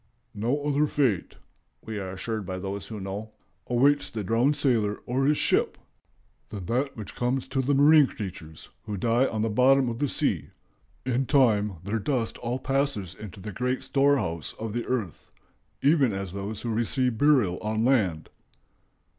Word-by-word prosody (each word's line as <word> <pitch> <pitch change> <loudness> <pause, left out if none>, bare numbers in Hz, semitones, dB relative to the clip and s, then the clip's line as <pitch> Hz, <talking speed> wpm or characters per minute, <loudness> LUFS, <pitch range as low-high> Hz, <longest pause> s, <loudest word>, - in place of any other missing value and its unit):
"No 120 +7 -1
other 145 +1 +2
fate," 125 -12 0 0.5
we 110 -2 -4
are 95 -1 -5
assured 110 +3 -3
by 95 0 -5
those 100 +1 -5
who 110 -2 -6
know, 100 +3 -6 0.3
"awaits 140 +4 +3
the 110 -2 -4
drowned 120 +8 +2
sailor 115 -8 +1
or 130 +2 0
his 150 0 +3
ship - - +1 0.7
than 100 -4 -6
that 130 +7 -1
which 105 -3 -7
comes 125 +1 -1
to 135 0 0
the 140 +2 +1
marine 145 +1 +6
creatures 85 -8 -8
who 105 -2 -4
die 120 +6 +2
on 110 -1 -2
the 115 - 0
bottom 130 +3 +4
of 115 0 -5
the 145 - +1
sea. - - -1 0.6
In 130 0 0
time 110 -8 +3
their 105 +4 -2
dust 120 0 -1
all 120 +1 -2
passes 135 - -1
into 100 0 -10
the 105 +3 -6
great 125 +6 -2
storehouse 135 - +1
of 110 -1 -5
the 120 0 -3
earth, 110 - -3 0.5
even 140 -5 +4
as 95 -2 -4
those 100 +2 -5
who 115 -2 -2
receive 120 +1 0
burial 130 -12 +3
on 110 +1 -1
land." 95 - +1
115 Hz, 170 wpm, -26 LUFS, 100-135 Hz, 0.7 s, marine